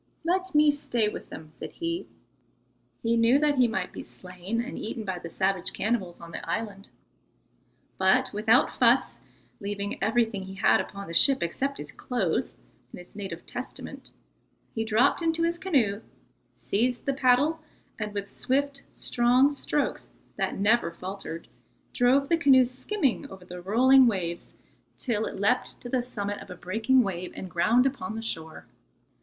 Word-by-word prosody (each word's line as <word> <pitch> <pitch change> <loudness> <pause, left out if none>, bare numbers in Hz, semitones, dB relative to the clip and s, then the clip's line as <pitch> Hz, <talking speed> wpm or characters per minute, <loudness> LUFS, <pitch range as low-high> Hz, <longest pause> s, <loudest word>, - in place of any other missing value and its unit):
"Let 370 +1 -1
me 300 0 +6
stay 240 -6 0
with - - -8
them," 155 -1 -10
said - - -9
he. 335 +1 -3 1.0
He 230 0 +2
knew 230 +3 +5
that 290 -2 +2
he 250 - +6
might 190 -5 -3
be - - -7
slain 185 +5 -6
and 245 +4 -4
eaten 220 +1 -5
by 185 -2 -3
the 170 - -8
savage 190 +1 +1
cannibals 205 -6 -2
on 170 0 -11
the - - -6
island. 200 +1 -4 1.1
But 200 +8 +3
without 220 +6 +3
fuss, - - +3 0.4
leaving 200 0 -4
everything 225 -3 +1
he 190 0 -9
had 205 - +4
upon 200 0 -8
the 165 - -7
ship 270 +9 +5
except 275 +11 -2
his - - -8
clothes 215 -10 -2 0.4
and - - -9
his 180 +3 -14
native 200 -2 -6
Testament, - - -8 0.6
he 225 - -1
dropped 225 +9 +3
into 330 0 +1
his 340 +1 0
canoe, 235 - +1 0.5
seized 240 +4 -1
the 275 - +1
paddle, 275 +5 +3 0.4
and 210 -1 -3
with 200 -1 -5
swift, 275 +1 -1
strong 250 +4 +3
strokes 290 0 -2 0.3
that - - -2
never 215 +3 +3
faltered, 180 -1 -7 0.5
drove 265 +3 +3
the 335 - +3
canoe 270 -5 +6
skimming 280 - -2
over 190 -1 -12
the 180 0 -8
rolling 255 +7 +5
waves 175 -6 -3 0.4
till 220 -4 -1
it - - -7
leapt 225 +6 +1
to 245 - -7
the 255 0 +1
summit 205 -4 -4
of - - -12
a 180 - -7
breaking 220 +8 +2
wave 180 -3 -4
and 185 - -7
ground 230 +9 +3
upon 220 -7 -2
the 225 - -5
shore. 160 -7 -5
225 Hz, 160 wpm, -27 LUFS, 195-265 Hz, 1.1 s, me